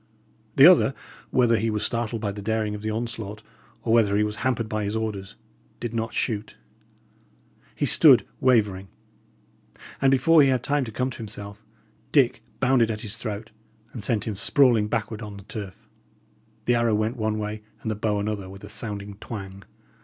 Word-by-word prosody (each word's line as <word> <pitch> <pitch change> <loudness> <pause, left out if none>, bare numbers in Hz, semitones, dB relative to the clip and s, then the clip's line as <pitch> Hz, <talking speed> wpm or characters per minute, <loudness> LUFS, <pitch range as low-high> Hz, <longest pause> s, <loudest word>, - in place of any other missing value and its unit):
The 135 - +8
other, 170 -6 +6 0.3
whether 120 -2 +3
he 110 +1 0
was 105 0 -1
startled 115 -1 -2
by 100 - 0
the 100 +1 -7
daring 110 0 -1
of 105 - -6
the 110 - -3
onslaught, 110 -2 -4 0.4
or 115 - +1
whether 105 -3 +4
he 105 - +3
was 105 0 -3
hampered 120 -2 -1
by 110 0 -2
his 105 +2 -2
orders, 105 -2 -4 0.4
did 120 -1 -4
not 115 0 -2
shoot; 110 -3 -2 1.2
he - - 0
stood - - +6
wavering; 105 -7 +2 1.1
and 135 - +5
before 150 +5 +5
he 140 - +5
had 130 -2 +1
time 145 0 +1
to 110 - -7
come 125 +4 -2
to - - -9
himself, 105 -1 -8 0.5
Dick 130 -5 +3 0.2
bounded 125 -3 +3
at 105 -1 -3
his 110 -2 -4
throat, 110 -2 -6 0.4
and 115 - -7
sent 110 -4 +1
him 110 - -3
sprawling 115 +2 +3
backward 110 0 -3
on 105 -2 -8
the 100 - -11
turf. 100 -2 -8 0.8
The 120 - +3
arrow 115 -2 +2
went 110 +3 0
one 110 -1 -1
way 105 0 -4 0.2
and 110 - -2
the - - -2
bow 105 -1 -1
another 100 -2 -3
with 95 +1 -12
a - - -9
sounding 100 -2 -5
twang. 100 -3 -8
110 Hz, 185 wpm, -25 LUFS, 105-120 Hz, 1.2 s, The